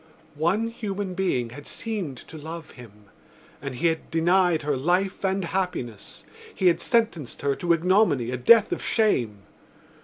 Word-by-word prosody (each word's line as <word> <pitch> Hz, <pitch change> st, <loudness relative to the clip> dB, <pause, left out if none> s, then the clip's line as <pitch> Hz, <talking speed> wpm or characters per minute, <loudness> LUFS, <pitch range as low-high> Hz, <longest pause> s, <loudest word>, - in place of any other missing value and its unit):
One 175 Hz, +10 st, 0 dB
human 205 Hz, -4 st, -4 dB
being 150 Hz, -11 st, -1 dB
had 145 Hz, +4 st, -10 dB
seemed 195 Hz, -, -5 dB
to -, -, -12 dB
love 160 Hz, +1 st, -8 dB
him 120 Hz, -4 st, -13 dB, 0.7 s
and 140 Hz, -2 st, -5 dB
he 125 Hz, -, -3 dB
had 160 Hz, -1 st, 0 dB
denied 175 Hz, 0 st, +2 dB
her 145 Hz, -1 st, 0 dB
life 180 Hz, +9 st, 0 dB
and 190 Hz, -1 st, 0 dB
happiness: 165 Hz, -, -4 dB, 0.3 s
he 190 Hz, -, -2 dB
had 170 Hz, -, 0 dB
sentenced 220 Hz, -, 0 dB
her 140 Hz, -1 st, +2 dB
to 175 Hz, -, 0 dB
ignominy, 170 Hz, -, +3 dB
a 130 Hz, -, -2 dB
death 220 Hz, -, +6 dB
of -, -, -2 dB
shame. 120 Hz, -, +1 dB
170 Hz, 155 wpm, -25 LUFS, 140-195 Hz, 0.7 s, death